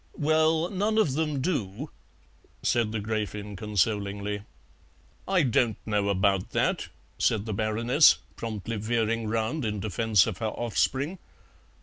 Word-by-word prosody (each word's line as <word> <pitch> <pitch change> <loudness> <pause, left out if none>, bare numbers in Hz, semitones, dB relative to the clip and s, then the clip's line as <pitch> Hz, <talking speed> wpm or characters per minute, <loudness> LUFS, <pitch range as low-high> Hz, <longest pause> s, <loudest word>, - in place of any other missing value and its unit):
"Well, 155 +2 +2
none 205 +3 0
of 185 -12 +3
them 150 -2 -1
do," 130 - -2 0.7
said 115 -3 +1
the 110 - -2
Gräfin 105 -1 -3
consolingly. 105 0 -1 0.9
"I 190 -3 +3
don't 125 -3 +2
know 105 -2 0
about 95 -1 +1
that," - - 0 0.3
said 110 -2 +1
the 110 - -3
Baroness, 115 +8 +4 0.2
promptly 110 0 -4
veering 115 +1 0
round 115 +7 -1
in 105 -2 -2
defence 105 0 +2
of 110 -5 -4
her 110 - -1
offspring. 130 - -1
110 Hz, 125 wpm, -27 LUFS, 105-140 Hz, 0.9 s, Baroness